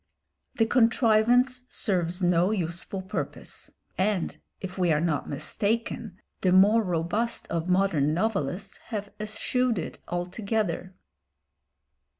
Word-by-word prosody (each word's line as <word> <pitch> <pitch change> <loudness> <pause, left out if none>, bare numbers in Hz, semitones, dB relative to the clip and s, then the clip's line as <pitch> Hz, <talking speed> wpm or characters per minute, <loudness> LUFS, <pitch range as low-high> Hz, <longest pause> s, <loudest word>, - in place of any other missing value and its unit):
The 225 - +3
contrivance 245 +2 +3
serves 180 -3 0
no 175 +1 +4
useful 185 -1 -2
purpose, 190 - -5 0.3
and, 190 -2 +1 0.2
if 190 -1 -6
we 180 -3 +2
are 150 - +3
not 165 -3 -1
mistaken, 205 +6 -2 0.2
the 185 - +3
more 200 +5 +6
robust 185 +5 -1
of 170 +1 -2
modern 180 -6 +3
novelists 195 0 -1
have 205 -3 -4
eschewed 225 +3 0
it - - -5
altogether. 185 +1 -2
195 Hz, 110 wpm, -27 LUFS, 175-220 Hz, 0.3 s, more